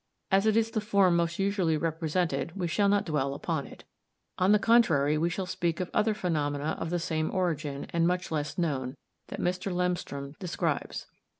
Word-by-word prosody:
As 195 +2 +4
it 220 0 +4
is 225 0 +2
the 215 - -1
form 200 -4 +3
most 170 0 0
usually 195 -5 +1
represented, 165 +2 -1
we 180 -3 -1
shall 200 +5 +2
not 205 0 +2
dwell 140 -4 -1
upon 155 -1 -2
it. - - -13 0.6
On 185 +2 +4
the 210 - +7
contrary, 170 -11 +4
we 165 +3 +1
shall 185 +2 -3
speak 170 -2 -2
of 180 - -3
other 215 0 +2
phenomena 150 -5 -1
of 165 - -3
the 175 - 0
same 160 -2 -1
origin, 155 -7 -2
and 170 0 +3
much 180 0 -1
less 150 -1 -2
known, 140 -6 -1 0.3
that - - -7
Mr. 185 +2 -1
Lemstrom 175 -6 -2
describes. 180 -4 -2
170 Hz, 185 wpm, -29 LUFS, 155-190 Hz, 0.6 s, the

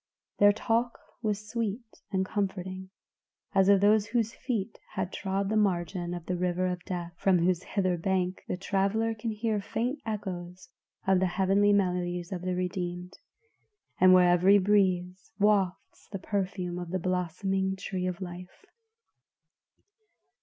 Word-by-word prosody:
Their 205 0 +7
talk 230 +3 0 0.2
was 210 -2 -2
sweet 225 0 -4
and 190 -1 +1
comforting, 190 -2 -3 0.6
as 195 -1 +4
of 200 -1 +6
those 210 0 +4
whose 230 -1 0
feet 230 -5 -3 0.2
had 190 -2 -2
trod 195 0 -2
the 220 - 0
margin 175 -3 0
of 175 -2 -8
the 180 - -2
river 180 0 0
of 180 -1 -2
death, 175 -2 -4
from 190 -2 +4
whose 175 0 +1
hither 185 -3 -1
bank 185 +1 -1
the - - -2
traveler 200 +4 0
can 225 +1 -4
hear 215 -1 -1
faint 245 +7 -2
echoes 185 -3 -6 0.4
of 190 -2 +4
the 190 - +2
heavenly 195 +3 +3
melodies 180 -2 0
of 180 -2 -4
the 180 0 -2
redeemed, 180 0 -3 0.9
and 185 0 +7
where 180 -1 +7
every 185 +3 +6
breeze 185 -2 +1
wafts 200 -3 0
the 195 - -3
perfume 185 -2 -3
of 175 -1 -6
the 185 - -1
blossoming 185 +2 -1
tree 185 -1 -3
of 180 +1 -4
life. 180 - -9
190 Hz, 145 wpm, -29 LUFS, 180-205 Hz, 0.9 s, Their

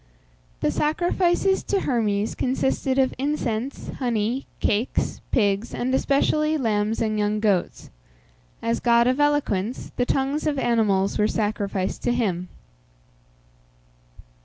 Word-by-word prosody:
The - - +2
sacrifices 350 +4 +1
to 395 -2 0
Hermes 215 -4 0
consisted 265 +1 0
of 265 -1 +3
incense, 265 -3 -2
honey, 240 0 -1
cakes, 215 +5 0
pigs, 205 -1 +1
and 255 +2 -1
especially 305 +3 +2
lambs 220 -4 0
and 215 -1 -1
young 210 0 0
goats. 205 -4 -1 0.7
As 230 0 0
god 235 -1 +4
of 255 +3 +1
eloquence, 270 -7 0
the 245 - +2
tongues 275 +3 0
of 295 -2 0
animals 215 -6 +1
were 210 - +4
sacrificed 205 -3 -2
to 240 - +1
him. 185 -7 -1
235 Hz, 115 wpm, -24 LUFS, 210-275 Hz, 0.7 s, god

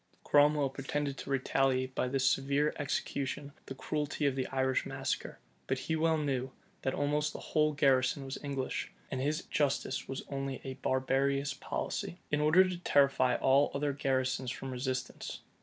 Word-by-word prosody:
Cromwell 145 -1 +4
pretended 140 +1 -2
to - - -7
retaliate 130 -1 +1
by 130 - 0
this 135 +1 +1
severe 140 +2 +2
execution 140 0 -2 0.2
the 135 - -6
cruelty 150 +1 -2
of 140 -2 +2
the 130 -1 -1
Irish 130 -1 +1
massacre: - - -3 0.3
but 130 - 0
he 160 +4 -2
well 160 0 +2
knew, 135 -4 -1 0.3
that 130 - -1
almost 150 +1 0
the - - -6
whole 155 -1 +3
garrison 135 -1 +2
was 135 - -5
English; 135 -2 -3 0.2
and 130 - -2
his 150 +4 0
justice 135 -2 -1
was 135 0 -4
only 135 -1 -3
a 135 - -4
barbarous 135 +1 +1
policy, 140 +4 -4
in 150 0 +2
order 170 +5 +6
to 180 -1 -4
terrify 140 -6 +3
all 135 +2 +4
other 145 0 0
garrisons 130 -2 0
from 135 +1 -5
resistance. 130 0 -4
135 Hz, 160 wpm, -32 LUFS, 130-145 Hz, 0.3 s, order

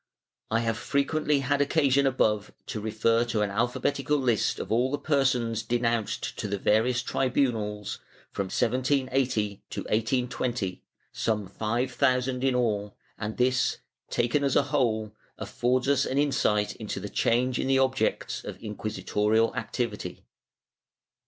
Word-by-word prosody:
I 115 +1 +1
have 115 -1 -1
frequently 145 0 +1
had 140 +2 +1
occasion 140 -2 +3
above 105 -5 +1
to 110 - -4
refer 110 +2 +2
to 110 -3 0
an 100 - -1
alphabetical 125 +6 0
list 125 -5 +1
of - - -6
all 120 +3 +3
the 145 - -1
persons 130 -7 +1
denounced 115 -1 -1
to - - -2
the 100 0 -2
various 120 +5 +2
tribunals, 115 -7 -1 0.3
from 100 - -2
1780 130 -2 0
to - - -4
1820, 120 -3 -1 0.3
some 105 -2 -1
five 115 +6 -1
thousand 130 0 +1
in 135 -2 +2
all, 105 -4 0 0.2
and 110 0 -4
this, 125 0 +2 0.3
taken 120 +5 +1
as 140 -2 +1
a - - +5
whole, 110 -6 +1 0.3
affords 125 +1 0
us 140 -1 +3
an 130 - -2
insight 105 -8 +1
into 105 -3 -4
the 105 - -5
change 125 +4 +1
in - - -1
the 135 0 +3
objects 130 -4 0
of - - -7
inciuisitorial 105 +1 0
activity. 115 -2 -4
120 Hz, 140 wpm, -27 LUFS, 110-130 Hz, 0.3 s, a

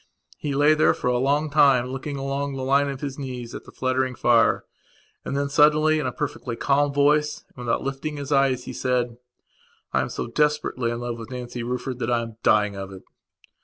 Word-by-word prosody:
He 145 -2 -3
lay 145 +2 +5
there 155 - +3
for - - -1
a 125 0 +1
long 145 +3 +1
time, 135 -4 +4
looking 140 +2 -5
along 135 +1 -3
the 130 - -4
line 140 +2 +2
of 135 -1 -6
his 140 -1 -5
knees 125 -3 -6
at - - -8
the - - -13
fluttering 130 0 -1
fire, 120 -1 +3 0.6
and 140 - -3
then 140 0 0
suddenly, 155 +2 +4
in 145 - -1
a - - -1
perfectly 130 -3 -4
calm 145 +3 +2
voice, 150 +1 +2
and - - -32
without 120 -1 -1
lifting 140 +2 -4
his 140 -1 -6
eyes, 135 -3 +2
he - - -7
said: 125 -2 -1 0.8
"I - - +3
am - - -3
so - - -4
desperately 150 -2 0
in 120 0 -3
love 120 -1 -4
with 115 - -8
Nancy 125 -1 -6
Rufford 125 +1 -4
that - - -2
I 120 -1 +1
am 115 -1 -9
dying 105 -2 +3
of 95 0 -6
it." 95 -1 -11
135 Hz, 210 wpm, -24 LUFS, 120-145 Hz, 0.8 s, lay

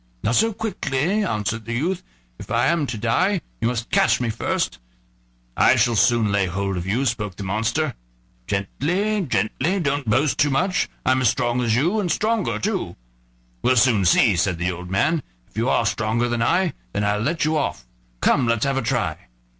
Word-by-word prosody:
"Not 115 - +1
so 225 - +3
quickly," 205 - -1
answered 110 - -2
the 115 +1 -3
youth. 175 +8 -1 0.4
"If - - -10
I 115 +4 +2
am 165 -4 +1
to 120 - -4
die, 175 - +1 0.2
you 115 - +2
must 120 -1 -3
catch 110 0 +3
me 120 -2 -1
first." 85 - -2 0.8
"I - - +5
shall 120 -1 +2
soon 110 +1 +3
lay 100 -2 +1
hold 95 +2 -2
of 90 0 -4
you," 120 +8 0
spoke 105 -6 -2
the 100 - -7
monster. 115 +9 -1 0.5
"Gently, 180 - -1
gently, 145 - 0
don't 140 -6 -1
boast 135 +7 +1
too 145 -1 +4
much, 180 +8 0 0.2
I'm 130 0 +3
as 125 - +4
strong 120 +1 0
as 115 -2 +1
you, 170 - +1
and 180 -5 -1
stronger 220 +4 0
too." 190 - -2 0.7
"We'll 130 - +3
soon 115 -4 +4
see," 100 +3 +4
said 85 0 0
the 90 +2 -1
old 90 +1 -8
man; 155 - +1 0.3
"if - - -31
you - - 0
are - - +2
stronger 115 +2 0
than 120 -1 -1
I 175 +8 +2 0.2
then 100 - -1
I'll 105 0 +1
let 155 +9 0
you 155 +1 +1
off; 105 - -2 0.4
come, 125 - +3
let's 115 +2 +1
have 135 -1 0
a - - +1
try." 115 - -2
120 Hz, 195 wpm, -22 LUFS, 105-155 Hz, 0.8 s, I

